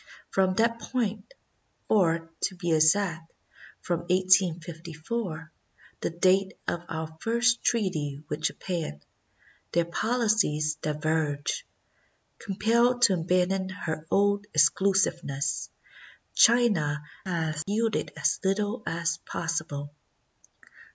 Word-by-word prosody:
From 190 -1 +2
that 230 +2 +2
point, 220 -3 -3 0.6
or, 165 -5 +2
to 185 - -3
be 175 -2 -2
exact, 165 +1 +2 0.5
from 175 -2 -1
1854, 170 0 0 0.5
the - - -1
date 185 +3 +2
of 170 - -1
our 160 0 -5
first 235 +3 +2
treaty 155 -10 -1
with 150 +1 -4
Japan, 165 - -3 0.7
their 170 0 +2
policies 210 -7 +1
diverged. 150 -1 -1 0.8
Compelled 235 +5 +2
to 205 - +7
abandon 180 +2 +1
her 165 -4 -5
old 200 +2 +2
exclusiveness, 155 -2 +2 0.6
China 200 -12 +4 0.2
has 160 -4 -2
yielded 220 +2 0
as 145 -1 +1
little 205 +4 0
as 165 0 -1
possible. 155 -3 -4
175 Hz, 95 wpm, -27 LUFS, 160-205 Hz, 0.8 s, to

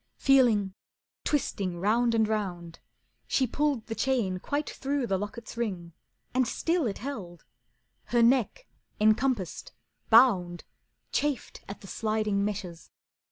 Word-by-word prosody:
Feeling, 235 -8 +4 0.5
twisting, 195 -11 -1
round 230 +5 +2
and 220 -1 +3
round, 180 -6 -3 0.5
She 265 - +2
pulled 280 -1 -1
the 225 - -4
chain 225 -8 0
quite 290 +9 -2
through 275 -1 -2
the 195 -4 0
locket's 215 +3 -7
ring 185 -8 -3 0.4
And 255 -1 +2
still 330 0 0
it 200 - -3
held. 195 - -7 0.6
Her 235 +2 +2
neck, 255 - +2 0.3
encompassed, 215 -2 +1 0.4
bound, 195 -8 +5 0.5
Chafed 290 -5 -2
at 200 - -8
the 195 - -11
sliding 215 -1 -1
meshes. 185 -5 -5
220 Hz, 120 wpm, -28 LUFS, 195-255 Hz, 0.6 s, bound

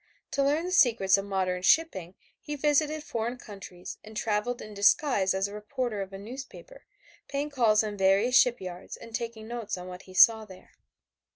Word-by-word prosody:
To 280 - 0
learn 295 +4 +1
the 365 - -4
secrets 230 - +4
of 195 - -5
modern 185 -2 -1
shipping 190 - +2 0.3
he 295 - -5
visited 300 +1 +1
foreign 235 -1 -3
countries 195 -6 -10
and 215 0 -10
traveled 220 +3 -1
in 215 - -9
disguise 200 -1 +3
as 190 +1 0
a 200 - -10
reporter 210 +1 -3
of 195 0 -6
a 195 - -7
newspaper, 265 - -10 0.4
paying 285 +2 -3
calls 225 -5 +3
on 210 -1 -5
various 195 +6 +3
shipyards 185 -9 +1
and 230 - -13
taking 230 -1 -5
notes 230 -4 -4
on 180 0 -8
what 180 0 -9
he 185 - -12
saw 220 +3 +7
there. 190 -3 -15
220 Hz, 180 wpm, -28 LUFS, 195-255 Hz, 0.4 s, saw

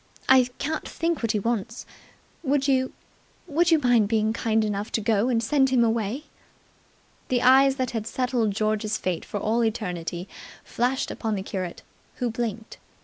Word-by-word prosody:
I 260 -1 +6
can't 310 +2 -3
think 330 -1 -1
what 230 -1 0
he - - +1
wants. 230 +1 -3 0.6
Would 280 -2 +1
you 260 -1 +2 0.5
would 335 +2 +2
you 325 - +6
mind 245 -7 +3
being 220 0 +1
kind 220 -1 +1
enough 205 +1 -3
to - - +2
go 220 +2 +1
and 230 -2 +1
send 270 +2 +3
him 255 -2 +3
away?" 230 +4 -1 1.0
The 245 -1 0
eyes 265 +2 +6
that 255 -2 -2
had 225 -2 -3
settled 250 -3 0
George's 215 +1 -1
fate 180 -3 -2
for 205 - -5
all 225 +4 +1
eternity 180 -5 -3 0.4
flashed 250 +3 -1
upon 220 -2 -2
the 190 - -3
curate, 185 -3 -5 0.3
who 245 -2 -2
blinked. 225 -1 -4
230 Hz, 165 wpm, -25 LUFS, 215-260 Hz, 1.0 s, I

